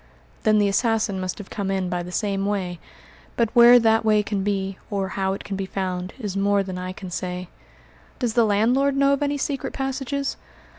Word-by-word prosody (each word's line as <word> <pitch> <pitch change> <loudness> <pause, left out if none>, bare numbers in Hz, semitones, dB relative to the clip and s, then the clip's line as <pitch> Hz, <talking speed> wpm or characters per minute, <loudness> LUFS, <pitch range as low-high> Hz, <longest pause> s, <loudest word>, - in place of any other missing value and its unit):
"Then 215 -1 +3
the 205 -1 +3
assassin 215 -1 +1
must 185 -1 -3
have 205 - -10
come 200 -2 -3
in 190 -1 0
by 180 0 -2
the 175 +1 -7
same 195 0 -1
way; 185 -4 -2 0.6
but 230 -2 +2
where 240 +1 +9
that 225 -1 +3
way 215 -1 +3
can 205 -2 -2
be, 195 -1 -2
or 195 -2 -2
how 190 0 -1
it 195 - -6
can 200 - -5
be 195 0 -3
found, 185 -1 -3
is 205 -7 -5
more 200 0 +2
than 185 -1 -5
I 185 0 -4
can 185 -1 -9
say." 180 0 -4 0.7
"Does 240 -4 -1
the 235 - +4
landlord 245 +7 +2
know 275 0 +4
of 280 - -1
any 290 0 0
secret 275 -1 -3
passages?" 270 +1 -2
205 Hz, 205 wpm, -23 LUFS, 190-235 Hz, 0.7 s, where